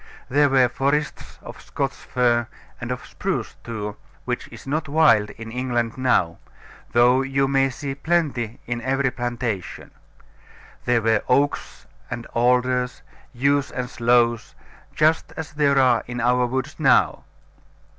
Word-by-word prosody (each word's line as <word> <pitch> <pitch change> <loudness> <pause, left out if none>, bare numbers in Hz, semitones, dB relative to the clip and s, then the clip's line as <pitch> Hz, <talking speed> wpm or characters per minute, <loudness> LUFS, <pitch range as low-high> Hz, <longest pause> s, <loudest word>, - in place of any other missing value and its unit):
There 145 +2 +4
were 130 -2 +4
forests 140 +4 -2
of - - -10
Scotch - - -3
fir, 120 -2 0 0.3
and - - -5
of - - -4
spruce - - -3
too, 105 -3 -5 0.3
which - - -3
is - - -13
not 150 +2 -2
wild 130 -9 +4
in 115 +1 -9
England 120 -2 -1
now, 95 -10 +1 0.5
though 125 +2 +4
you 135 0 0
may 135 0 +2
see 135 +1 -5
plenty 145 -7 -1
in 120 0 -3
every 135 +1 0
plantation. 120 -6 -4 0.9
There 120 -2 +2
were 110 -2 +2
oaks 140 +3 0 0.2
and 120 - -5
alders, 125 +1 +1 0.3
yews 140 +2 +1
and 125 -1 -4
sloes, 120 -2 +1 0.4
just 155 +1 +2
as 160 -1 -5
there 145 -2 +2
are 125 -3 +4
in 120 0 -5
our 125 +1 +2
woods 130 +5 -4
now. 135 -5 +3
125 Hz, 135 wpm, -23 LUFS, 120-135 Hz, 0.9 s, There